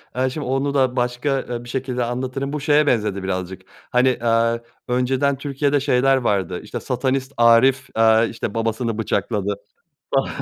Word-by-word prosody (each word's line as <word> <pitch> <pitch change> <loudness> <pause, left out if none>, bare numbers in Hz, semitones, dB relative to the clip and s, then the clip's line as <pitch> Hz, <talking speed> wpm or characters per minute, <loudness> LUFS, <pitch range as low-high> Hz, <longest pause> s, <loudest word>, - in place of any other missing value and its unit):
Eee, 130 +1 +1
şimdi 145 +2 -5
onu 135 +2 0
da 130 -2 +2
başka, 125 +3 0
eee, 120 0 -4
bir 120 - -11
şekilde 125 -1 -2
anlatırım. 130 +3 -3
Bu 150 - -2
şeye 145 +1 +3
benzedi 105 -6 0
birazcık. 95 0 -4 0.3
Hani, 125 +1 +4
eee, 115 0 +2 0.3
önceden 130 +3 +1
Türkiye'de 140 +1 0
şeyler 135 0 +3
vardı, 95 -7 -1
işte, 105 - -6
satanist 130 +1 -2
Arif, 120 +3 +4
eee, 110 0 +5
işte, 110 -2 -5
babasını 115 0 -1
bıçakladı 100 -2 -1 0.6
falan - - +2
125 Hz, 155 wpm, -21 LUFS, 115-135 Hz, 0.6 s, eee